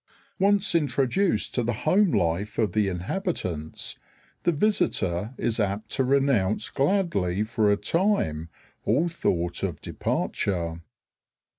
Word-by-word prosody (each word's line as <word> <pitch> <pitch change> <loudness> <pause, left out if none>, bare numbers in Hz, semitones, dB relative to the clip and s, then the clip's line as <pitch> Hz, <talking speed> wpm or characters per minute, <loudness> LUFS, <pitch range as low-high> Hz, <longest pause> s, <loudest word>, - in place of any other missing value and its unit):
Once 200 +1 +3
introduced 145 - +1
to 125 - +1
the 120 0 0
home 190 +5 +4
life 100 - 0
of 110 -3 +1
the 105 -2 +2
inhabitants, 90 - -3 0.5
the 175 - +4
visitor 115 - 0
is 115 0 0
apt 105 +1 -1
to 135 - +1
renounce 125 -7 +2
gladly 135 - +1
for 110 -2 +1
a 100 - +3
time 105 - 0 0.3
all 140 +11 +2
thought 90 - -1
of 90 -6 -2
departure. 85 -4 -2
110 Hz, 120 wpm, -26 LUFS, -, 0.5 s, home